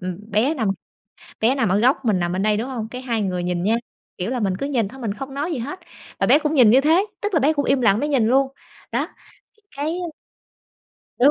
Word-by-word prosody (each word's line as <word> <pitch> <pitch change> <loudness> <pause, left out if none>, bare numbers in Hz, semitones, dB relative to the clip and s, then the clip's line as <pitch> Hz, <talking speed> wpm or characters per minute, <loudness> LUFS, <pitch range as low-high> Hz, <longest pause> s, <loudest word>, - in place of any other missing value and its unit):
ừm, 185 +4 -6
bé 225 +9 +2
nằm 225 -9 -1 0.7
bé 235 +5 +3
nằm 245 -8 +1
ở 195 - +3
góc, 255 +6 +4
mình 205 -5 +2
nằm 175 0 -1
bên 190 +2 -1
đây, 210 -1 +2
đúng 240 +5 -3
hông? 230 -4 -4
Cái 250 +1 -7
hai 235 -4 -1
người 180 -3 -2
nhìn 175 -1 -1
nh - - 0 0.5
kiểu 185 +7 -3
là, 255 - -1
mình 195 -4 0
cứ 275 - -3
nhìn 245 -8 0
thôi 265 +6 -12
mình 220 -4 -2
không 270 +5 -7
nói 295 +5 -2
gì 300 - -2
hết 290 +10 -5 0.4
và - - +2
bé 295 - +6
cũng 300 0 -1
nhìn 245 -6 +7
như 260 +4 +6
thế, 330 +7 +4 0.2
tức 410 -1 -2
là 325 - +4
bé 295 +3 +3
cũng 285 -2 -1
im 270 -2 +2
lặng, 215 -1 +4
bé 295 - 0
nhìn 260 -7 +2
luôn. 265 +3 +3 0.4
Đó, - - 0 0.5
thì 435 - -34
cái 315 +5 -2 1.2
Đúng. 265 +4 +6
245 Hz, 255 wpm, -22 LUFS, 210-280 Hz, 1.2 s, nhìn